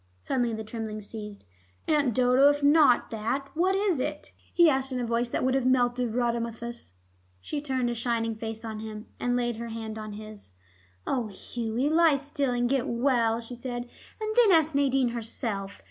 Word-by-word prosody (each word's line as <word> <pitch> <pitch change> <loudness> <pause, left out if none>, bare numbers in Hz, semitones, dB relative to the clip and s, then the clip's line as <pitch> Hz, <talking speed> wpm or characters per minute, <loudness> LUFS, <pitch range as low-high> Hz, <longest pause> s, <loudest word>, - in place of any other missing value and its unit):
Suddenly 240 - -1
the 220 - -5
trembling 220 -1 -5
ceased. 210 - -8 0.4
"Aunt 285 -7 +2
Dodo, 255 +2 +5
if 290 0 0
it - - +4
is 290 - +6
not 290 -7 +4
that, 235 +5 -2
what 370 +4 +2
is 390 -6 +1
it?" 300 +3 -4 0.2
he 345 -1 +5
asked, 270 -2 +1
in 255 - -2
a 245 - -1
voice 235 +1 0
that - - -1
would 260 0 +2
have 265 -1 +1
melted 245 -2 +2
Rhadamanthus. 235 - -2 0.5
She 290 - -4
turned 260 -4 -1
a 240 - 0
shining 230 -1 -1
face 220 +1 -6
on 220 -1 -5
him, 215 0 -7
and 245 0 0
laid 240 -2 -1
her 235 +1 -5
hand 225 -1 -6
on 215 -1 -6
his. 215 - -10 0.5
"Oh, 245 -4 -1
Hughie, 230 +6 -3
lie 325 -2 +5
still 285 0 -2
and 245 0 +1
get 265 -1 0
well," 235 -2 +2
she 235 +2 -8
said. 240 0 -5 0.3
"And 435 0 -3
then 465 -5 +6
ask 320 -2 +4
Nadine 270 -2 +2
herself. 220 -4 -4
240 Hz, 190 wpm, -27 LUFS, 225-275 Hz, 0.5 s, is